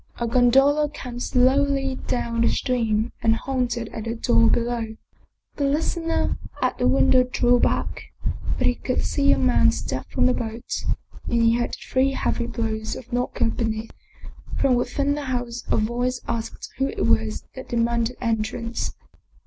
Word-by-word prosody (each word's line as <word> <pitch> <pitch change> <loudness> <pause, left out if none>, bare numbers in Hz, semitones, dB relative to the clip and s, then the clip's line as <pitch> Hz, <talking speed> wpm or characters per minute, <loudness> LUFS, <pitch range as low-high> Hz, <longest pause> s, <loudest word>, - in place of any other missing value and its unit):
A 235 - 0
gondola 270 +5 +4
came 245 -3 -7
slowly 270 +2 +2
down 235 -1 -1
the 235 - +4
stream 230 -3 0
and 225 0 +3
halted 245 -2 -2
at 220 - -6
the 230 0 -2
door 115 - +4
below. 235 -2 0 0.6
The 285 - +1
listener 325 +3 0 0.2
at - - 0
the 250 - +2
window 260 -1 +5
drew 245 -1 +2
back, - - 0 0.5
but - - 0
he 250 - +4
could 255 +1 -2
see 280 -1 +2
a - - +4
man 125 -10 +4
step 105 +12 -4
from - - +1
the 255 - +4
boat, 225 -1 -4 0.4
and 235 -1 +1
he 230 0 +5
heard 240 0 -1
three 265 +1 0
heavy 235 -2 -1
blows 220 -2 -3
of 250 - -10
the - - -11
knocker 245 -2 0
beneath. 225 -1 -2 0.7
From 270 -2 +3
within 280 +3 +1
the 290 0 -4
house 245 -2 -3
a - - +2
voice 245 +3 0
asked 225 -1 -4
who 270 - +2
it - - -2
was 220 -1 +1
that 260 - -9
demanded 235 +1 0
entrance. 230 0 -2
240 Hz, 165 wpm, -24 LUFS, 230-260 Hz, 0.7 s, window